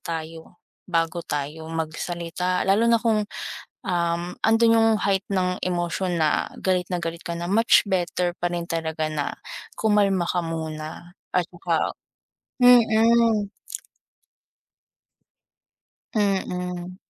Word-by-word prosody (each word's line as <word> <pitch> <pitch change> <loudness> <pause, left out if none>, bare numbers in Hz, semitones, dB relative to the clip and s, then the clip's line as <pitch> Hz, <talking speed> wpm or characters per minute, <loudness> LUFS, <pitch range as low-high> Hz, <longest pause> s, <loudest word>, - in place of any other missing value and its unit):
tayo 165 +1 -7 0.3
bago 165 -1 0
tayo 150 +2 -4
magsalita. 170 +2 -2
Lalo 205 +4 +3
na 235 - +5
kung, 225 -2 +2 0.7
um, 170 -1 0 0.2
andun 225 +1 +5
yung 225 0 +5
height 195 -1 +1
ng 180 -1 +1
emosyon 175 0 -1
na 155 -1 +1
galit 185 -1 +1
na 175 - 0
galit 165 0 -5
ka 170 - -4
na, 170 +1 -4
much 225 +4 +5
better 180 -1 0
pa 175 0 -2
rin 170 -1 -3
talaga 160 -1 -2
na 150 -2 -2 0.4
kumalma 200 -5 +2
ka 175 -1 0
muna 160 +2 -6 0.2
at 180 -1 +1
saka 170 -2 -1 0.6
mm. 230 -3 +5 2.7
Mm. 180 -3 -1
175 Hz, 110 wpm, -24 LUFS, 165-200 Hz, 2.7 s, na